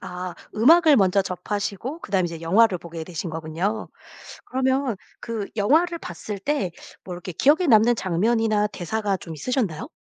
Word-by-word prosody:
아. 180 Hz, 0 st, -6 dB, 0.2 s
음악을 310 Hz, +6 st, +6 dB
먼저 195 Hz, -1 st, +4 dB
접하시고 205 Hz, -, -4 dB
그다음에 190 Hz, -, 0 dB
이제 165 Hz, -1 st, -7 dB
영화를 190 Hz, +3 st, +3 dB
보게 165 Hz, -1 st, -8 dB
되신 175 Hz, +1 st, -5 dB
거군요? 165 Hz, +6 st, -3 dB, 0.6 s
그러면 260 Hz, -1 st, 0 dB, 0.2 s
그 225 Hz, -4 st, -4 dB
영화를 315 Hz, -, +2 dB
봤을 200 Hz, -, -6 dB
때 200 Hz, -5 st, -1 dB, 0.3 s
뭐 180 Hz, -, -7 dB
이렇게 180 Hz, +1 st, -7 dB
기억에 300 Hz, -, +3 dB
남는 235 Hz, -1 st, +5 dB
장면이나 210 Hz, +3 st, +1 dB
대사가 205 Hz, +1 st, -2 dB
좀 165 Hz, -2 st, -9 dB
있으셨나요? 220 Hz, -, -2 dB
205 Hz, 345 characters per minute, -24 LUFS, 180-240 Hz, 0.6 s, 음악을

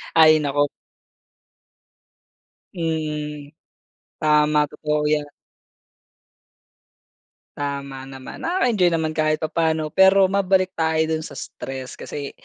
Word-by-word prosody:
Ay, 155 Hz, -1 st, +7 dB
naku. 145 Hz, 0 st, 0 dB, 2.0 s
Mm, 150 Hz, -3 st, -3 dB, 0.7 s
tama. 150 Hz, -1 st, +3 dB
Totoo 150 Hz, 0 st, -1 dB
yan. 150 Hz, -1 st, 0 dB, 2.3 s
Tama 140 Hz, -2 st, -5 dB
naman, 135 Hz, -1 st, -10 dB
nakaka-enjoy 240 Hz, -, +2 dB
naman 160 Hz, -1 st, 0 dB
kahit 155 Hz, 0 st, +1 dB
papaano. 160 Hz, -1 st, 0 dB
Pero 190 Hz, 0 st, +6 dB
mabalik 190 Hz, -1 st, +2 dB
tayo 160 Hz, -1 st, +1 dB
dun 160 Hz, 0 st, -1 dB
sa -, -, -10 dB
stress, 130 Hz, -1 st, -7 dB
kasi, 140 Hz, -1 st, -6 dB
155 Hz, 90 wpm, -22 LUFS, 145-165 Hz, 2.3 s, Ay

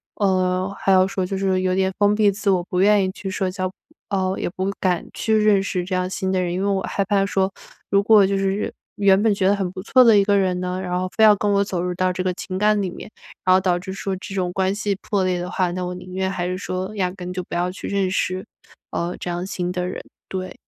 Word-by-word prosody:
呃， 185 Hz, -1 st, +1 dB
还 195 Hz, -, +1 dB
要 185 Hz, 0 st, +6 dB
说 190 Hz, -1 st, -2 dB
就 190 Hz, +1 st, -3 dB
是 190 Hz, -1 st, +1 dB
有 185 Hz, 0 st, +1 dB
点 190 Hz, 0 st, +1 dB
封 205 Hz, 0 st, +4 dB
闭 210 Hz, -1 st, +4 dB
自 200 Hz, +1 st, -2 dB
我， 185 Hz, -2 st, +3 dB
不 180 Hz, -, -1 dB
愿 205 Hz, 0 st, +5 dB
意 185 Hz, -, -2 dB
去 195 Hz, 0 st, -6 dB
社 190 Hz, 0 st, -1 dB
交， 185 Hz, 0 st, -3 dB, 0.4 s
呃， 190 Hz, -1 st, 0 dB
也 -, -, -2 dB
不 185 Hz, +2 st, -3 dB
敢 180 Hz, -2 st, 0 dB
去 220 Hz, -, -1 dB
认 210 Hz, -2 st, +4 dB
识 185 Hz, -2 st, -2 dB
这 185 Hz, -, -5 dB
样 185 Hz, 0 st, -1 dB
新 190 Hz, 0 st, -2 dB
的 185 Hz, -, +1 dB
人。 175 Hz, -1 st, -1 dB
因 185 Hz, -, -2 dB
为 200 Hz, -, 0 dB
我 195 Hz, -1 st, +1 dB
害 200 Hz, -, -1 dB
怕 195 Hz, 0 st, +2 dB
说， 195 Hz, -1 st, +1 dB, 0.4 s
如 200 Hz, 0 st, +3 dB
果 210 Hz, -2 st, +6 dB
就 195 Hz, 0 st, 0 dB
是 195 Hz, +1 st, -1 dB, 0.2 s
原 200 Hz, -2 st, +4 dB
本 220 Hz, -2 st, +4 dB
觉 195 Hz, -1 st, +1 dB
得 200 Hz, -, +4 dB
很 190 Hz, -3 st, -2 dB
不 185 Hz, -, -7 dB
错 255 Hz, +5 st, +5 dB
的 225 Hz, -3 st, +6 dB
一 200 Hz, -, +5 dB
个 200 Hz, 0 st, +3 dB
人 185 Hz, -2 st, +1 dB
呢， 180 Hz, +1 st, -3 dB
然 180 Hz, -1 st, -2 dB
后 185 Hz, -, -1 dB
非 220 Hz, -, +3 dB
要 215 Hz, -1 st, +9 dB
跟 205 Hz, -, 0 dB
我 200 Hz, 0 st, +3 dB
走 185 Hz, -3 st, -3 dB
入 180 Hz, 0 st, -2 dB
到 185 Hz, +1 st, 0 dB
这 180 Hz, -, -3 dB
个 185 Hz, 0 st, 0 dB
情 185 Hz, +1 st, -5 dB
感 210 Hz, +1 st, +3 dB
里 190 Hz, -, -1 dB
面， 180 Hz, -, -9 dB, 0.4 s
然 185 Hz, 0 st, +6 dB
后 190 Hz, -, +3 dB
导 180 Hz, -1 st, +1 dB
致 190 Hz, +1 st, -7 dB
说 195 Hz, 0 st, -3 dB
这 195 Hz, +1 st, -8 dB
种 180 Hz, -2 st, -1 dB
关 190 Hz, +1 st, 0 dB
系 205 Hz, -1 st, -1 dB
破 200 Hz, -2 st, 0 dB
裂 185 Hz, -1 st, 0 dB
的 175 Hz, +1 st, -4 dB
话， 180 Hz, -2 st, 0 dB
那 180 Hz, +1 st, -3 dB
我 180 Hz, -, -4 dB
宁 180 Hz, 0 st, -10 dB
愿 190 Hz, 0 st, -1 dB
还 180 Hz, -2 st, -2 dB
是 180 Hz, 0 st, -2 dB
说 185 Hz, +2 st, -4 dB
压 185 Hz, -2 st, +1 dB
根 180 Hz, -1 st, -7 dB
就 180 Hz, -, -3 dB
不 -, -, -7 dB
要 180 Hz, +1 st, 0 dB
去 185 Hz, -, -7 dB
认 195 Hz, -2 st, 0 dB
识， 185 Hz, 0 st, -1 dB, 0.5 s
呃， 170 Hz, +1 st, -2 dB
这 -, -, -4 dB
样 175 Hz, +1 st, -3 dB
新 180 Hz, -2 st, -3 dB
的 180 Hz, 0 st, -2 dB
人， 185 Hz, -, -5 dB, 0.3 s
对 185 Hz, -1 st, -5 dB
190 Hz, 295 characters per minute, -22 LUFS, 185-200 Hz, 0.5 s, 要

